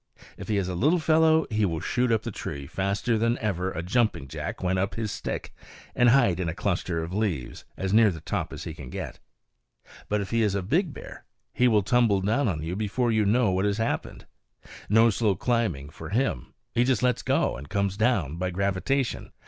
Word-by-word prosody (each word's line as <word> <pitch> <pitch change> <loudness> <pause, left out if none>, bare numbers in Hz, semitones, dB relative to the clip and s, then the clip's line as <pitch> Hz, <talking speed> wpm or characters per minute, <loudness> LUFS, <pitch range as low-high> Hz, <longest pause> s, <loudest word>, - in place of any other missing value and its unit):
If - - -9
he 105 - 0
is 95 -2 0
a 90 - -3
little 150 - +3
fellow, 160 0 +4
he 110 0 +1
will 80 -5 0
shoot 125 +7 0
up 110 -1 +1
the 115 - -4
tree, 70 -7 -6
faster 100 - -1
than 115 +2 +1
ever 95 -4 -2
a 85 - -4
jumping 105 - 0
jack 65 - -5
went 95 +1 +1
up 95 +1 -1
his 110 -2 -3
stick, - - -5 0.4
and 125 -1 +4
hide 120 -9 +4
in 90 -3 -1
a 80 - -4
cluster 90 -4 -1
of 85 +2 -6
leaves, 95 - -2
as 95 +1 -2
near 110 0 +6
the 85 -4 -5
top - - -3
as - - -7
he 80 - -6
can 70 -5 -10
get. - - -6 0.9
But 105 - +1
if 100 - -5
he 115 0 +2
is 105 -3 +1
a 100 - -1
big 160 - +1
bear, - - -11 0.3
he 125 - +3
will 105 -4 +3
tumble 115 -3 +3
down 115 +8 +1
on 80 -6 -2
you 85 +3 -3
before 110 +4 0
you 110 -2 +2
know 110 0 +3
what 95 +2 +1
has 100 0 0
happened. 115 0 -3 0.6
No 115 +2 +5
slow 105 -1 +1
climbing 105 - -1
for 80 0 -9
him; 110 - -1 0.2
he 120 - +3
just 125 -2 +1
lets 125 -1 +2
go - - +1
and 70 +4 -9
comes 100 -1 0
down 100 - +1
by 90 +1 -1
gravitation. 100 +8 -1
105 Hz, 215 wpm, -26 LUFS, 90-115 Hz, 0.9 s, near